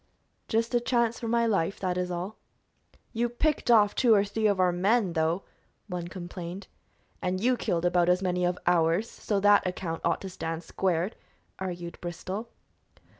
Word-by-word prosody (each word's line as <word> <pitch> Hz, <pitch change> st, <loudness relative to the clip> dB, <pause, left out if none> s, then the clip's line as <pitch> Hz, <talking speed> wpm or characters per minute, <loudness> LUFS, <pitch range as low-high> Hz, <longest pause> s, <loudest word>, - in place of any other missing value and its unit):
"Just 230 Hz, +2 st, 0 dB
a 240 Hz, -, +4 dB
chance 235 Hz, -1 st, +1 dB
for 230 Hz, -, -4 dB
my 235 Hz, +1 st, +2 dB
life, 195 Hz, -4 st, 0 dB
that 185 Hz, -2 st, -1 dB
is 180 Hz, 0 st, -1 dB
all." 180 Hz, +4 st, -5 dB, 0.7 s
"You 240 Hz, +1 st, 0 dB
picked 290 Hz, +3 st, 0 dB
off 210 Hz, -3 st, +6 dB
two 235 Hz, -4 st, +4 dB
or 200 Hz, 0 st, +3 dB
three 215 Hz, +2 st, 0 dB
of 200 Hz, -2 st, +1 dB
our 180 Hz, -1 st, +4 dB
men, 195 Hz, +2 st, +2 dB
though," 165 Hz, +3 st, 0 dB, 0.4 s
one 180 Hz, -4 st, -5 dB
complained. 175 Hz, +1 st, -7 dB, 0.6 s
"And 185 Hz, 0 st, -1 dB
you 250 Hz, +5 st, +3 dB
killed 175 Hz, -7 st, -1 dB
about 175 Hz, 0 st, +3 dB
as 180 Hz, 0 st, +4 dB
many 180 Hz, -1 st, 0 dB
of 180 Hz, 0 st, +1 dB
ours, 175 Hz, +4 st, +3 dB
so 205 Hz, -3 st, -2 dB
that 205 Hz, -1 st, +5 dB
account 175 Hz, -2 st, -4 dB
ought -, -, +1 dB
to 195 Hz, -, -6 dB
stand 165 Hz, -1 st, -4 dB
squared," 180 Hz, +2 st, -1 dB, 0.4 s
argued 175 Hz, -2 st, -5 dB
Bristol. 185 Hz, +6 st, -5 dB
185 Hz, 175 wpm, -28 LUFS, 175-220 Hz, 0.7 s, off